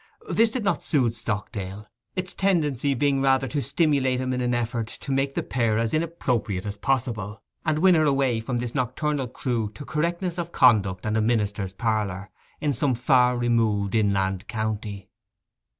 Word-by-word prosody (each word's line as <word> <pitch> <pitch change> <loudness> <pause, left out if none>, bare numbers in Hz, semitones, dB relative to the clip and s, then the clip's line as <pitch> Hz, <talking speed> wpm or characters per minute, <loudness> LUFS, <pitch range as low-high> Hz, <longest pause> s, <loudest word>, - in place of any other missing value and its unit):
This 230 0 +4
did 235 0 -3
not 200 - +1
soothe 125 -7 +1
Stockdale, 105 -3 -5 0.3
its 185 -1 -3
tendency 150 -8 +1
being 140 +1 +1
rather 135 0 +3
to 145 +2 -2
stimulate 140 -5 +1
in 130 0 -1
him 125 - -1
an 125 -1 +1
effort 120 -1 -2
to 130 +4 -7
make 135 +1 0
the - - -1
pair 115 -4 0
as 115 -1 0
inappropriate 125 - -1
as 100 -1 -4
possible, 110 -4 -2 0.3
and 155 -1 +2
win 185 +3 +5
her 155 -2 +4
away 135 -5 +2
from 120 +2 -3
this 120 -1 -3
nocturnal 135 +2 -1
crew 120 -3 -2
to 145 - -8
correctness 170 +4 -1
of 170 0 -4
conduct 100 - +3
and 105 +1 0
a - - +2
minister's 105 -4 0
parlour 105 -3 -2 0.3
in 150 -1 0
some 130 +1 +1
far 125 0 +3
removed 110 -4 +1
inland 100 -3 +1
county. 110 -3 -4
120 Hz, 170 wpm, -25 LUFS, 110-140 Hz, 0.3 s, win